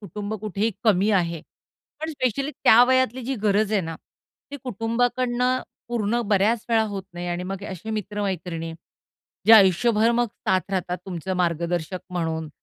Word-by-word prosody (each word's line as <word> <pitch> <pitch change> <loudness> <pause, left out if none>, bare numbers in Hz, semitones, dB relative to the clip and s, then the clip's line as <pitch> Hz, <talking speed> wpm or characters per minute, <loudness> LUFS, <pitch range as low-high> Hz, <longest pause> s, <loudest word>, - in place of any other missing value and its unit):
कुटुंब 205 +2 -5
कुठेही 215 +1 -1
कमी 205 0 +3
आहे. 170 -5 +1 0.6
पण 315 - -3
स्पेशली 275 0 -1
त्या 240 -5 +6
वयातली 260 -1 +2
जी 270 +2 -2
गरज 210 +1 +2
आहे 205 - +3
ना, 165 0 -5 0.6
ती 285 - -5
कुटुंबाकडून 240 +2 0 0.5
पूर्ण 235 0 0
बऱ्याच 210 +3 +2
वेळा 225 -1 +3
होत 200 -2 -5
नाही 175 0 -6
आणि 175 +1 -2
मग 195 +1 -5
असे 190 +4 -7
मित्र-मैत्रिणी, 185 -6 -3 0.7
जे 225 - +8
आयुष्यभर 215 +3 +5
मग 240 0 +2 0.2
साथ 190 +1 +1
राहतात 180 -1 -2
तुमचं 185 +1 -4
मार्गदर्शक 170 0 -1
म्हणून. 160 -3 -2
205 Hz, 145 wpm, -24 LUFS, 180-230 Hz, 0.7 s, जे